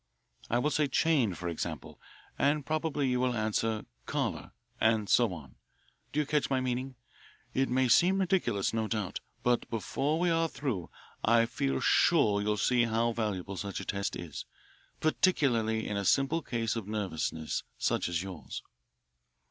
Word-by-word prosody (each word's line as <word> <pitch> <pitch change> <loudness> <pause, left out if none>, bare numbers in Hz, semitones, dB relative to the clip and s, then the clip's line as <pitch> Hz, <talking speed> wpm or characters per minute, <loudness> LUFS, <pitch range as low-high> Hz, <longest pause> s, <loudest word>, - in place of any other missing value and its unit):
I 120 - +2
will 150 +5 +1
say 150 -1 +2
'chain,' 135 - +2
for 90 +2 -5
example, 80 -3 -5 0.3
and 145 0 +1
probably 155 -2 0
you 125 -1 +1
will 125 -1 +1
answer 110 0 0 0.2
'collar,' - - -2 0.3
and 110 -2 +2
so 120 +2 +4
on. 75 -8 -10 0.5
Do 150 - 0
you 150 - +2
catch 145 -2 0
my 135 -1 +2
meaning? 130 +1 -2 0.6
It 135 0 +1
may 130 +1 +2
seem 180 +11 +5
ridiculous, 170 - +1
no 110 -1 0
doubt, 105 -4 -2 0.2
but 120 -1 +1
before 140 +7 -1
we 175 0 +2
are 165 0 +2
through 120 - -3 0.3
I 115 +1 +5
feel 70 - -1
sure 100 -1 +4
you'll 105 0 0
see 120 +2 +3
how 115 +1 +1
valuable 100 -4 -3
such 100 +1 -4
a - - -6
test 100 0 -2
is, 85 -5 -7 0.5
particularly 120 - +2
in 105 - -2
a 100 - -1
simple 135 +9 +2
case 115 -5 -2
of 110 -4 -4
nervousness 90 -7 -2 0.2
such - - 0
as 85 0 -1
yours." 95 -4 -7
115 Hz, 160 wpm, -30 LUFS, 100-135 Hz, 0.6 s, seem